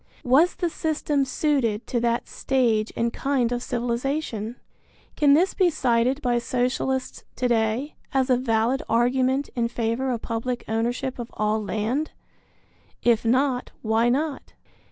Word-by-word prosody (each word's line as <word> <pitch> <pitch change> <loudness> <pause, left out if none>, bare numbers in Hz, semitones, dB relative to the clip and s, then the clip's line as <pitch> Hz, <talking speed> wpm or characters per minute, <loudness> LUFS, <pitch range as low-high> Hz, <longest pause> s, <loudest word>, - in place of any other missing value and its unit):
Was 290 +7 +4
the 350 - -1
system 300 -3 0
suited 260 -6 0
to 240 - -1
that 235 0 0
stage 230 -5 +1
and 235 0 0
kind 265 -4 0
of 245 0 -1
civilization? 240 -1 -2 0.6
Can 285 -1 +5
this 365 +5 +3
be 370 -3 +3
cited 255 -1 +1
by 240 -1 +2
Socialists 255 +2 -1
to 250 - 0
day 235 +4 0 0.2
as 265 -1 +1
a - - +6
valid 240 +1 +1
argument 255 +4 +2
in 235 -1 +1
favor 235 +2 -1
of 240 -3 -2
public 240 +2 -3
ownership 240 +4 -2
of 235 - -5
all 215 +1 0
land? 220 +9 -1 0.9
If 235 -2 +3
not, 255 +2 +1
why 225 +2 +2
not? 285 +2 -2
245 Hz, 140 wpm, -24 LUFS, 230-270 Hz, 0.9 s, a